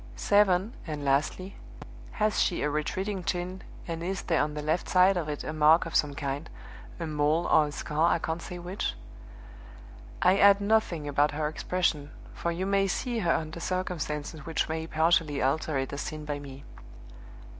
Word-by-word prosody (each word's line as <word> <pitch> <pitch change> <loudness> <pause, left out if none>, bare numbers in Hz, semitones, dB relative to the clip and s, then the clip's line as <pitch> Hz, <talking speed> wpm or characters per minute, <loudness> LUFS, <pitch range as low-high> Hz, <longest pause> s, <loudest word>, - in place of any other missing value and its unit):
7 205 +1 +3
(and 150 -2 -4
lastly). 150 +8 0 0.6
Has 215 0 +1
she 175 - +1
a 150 - 0
retreating 185 +6 -2
chin, 180 +2 -3 0.3
and 165 -1 -4
is 185 +2 -3
there 165 -3 +1
on 150 0 -2
the 150 - -4
left 155 +3 -1
side 185 +1 +5
of 165 -4 -2
it 150 - -4
a 155 - -4
mark 155 +2 +5
of 165 - -7
some 145 -2 +2
kind 140 +2 -4 0.5
a 170 - -3
mole 155 +2 +1
or 155 -1 +4
a - - -6
scar, 155 +3 0
I - - +3
can't 165 0 -3
say 180 - -7
which? 175 - -3 1.2
"I 195 +2 +4
add 200 0 +7
nothing 200 -7 +1
about 145 +1 +2
her 150 0 -1
expression, 155 -2 -1 0.2
for 170 - -2
you 175 +3 -3
may 195 0 +2
see 235 +5 -2
her 175 -5 +1
under 160 +1 -2
circumstances 160 -4 -3
which 160 +1 -1
may 160 0 -3
partially 160 -2 +2
alter 140 +2 0
it 135 0 -3
as 140 - -3
seen 155 -1 -6
by 145 -1 -3
me. 140 -1 -10
160 Hz, 180 wpm, -28 LUFS, 150-185 Hz, 1.2 s, add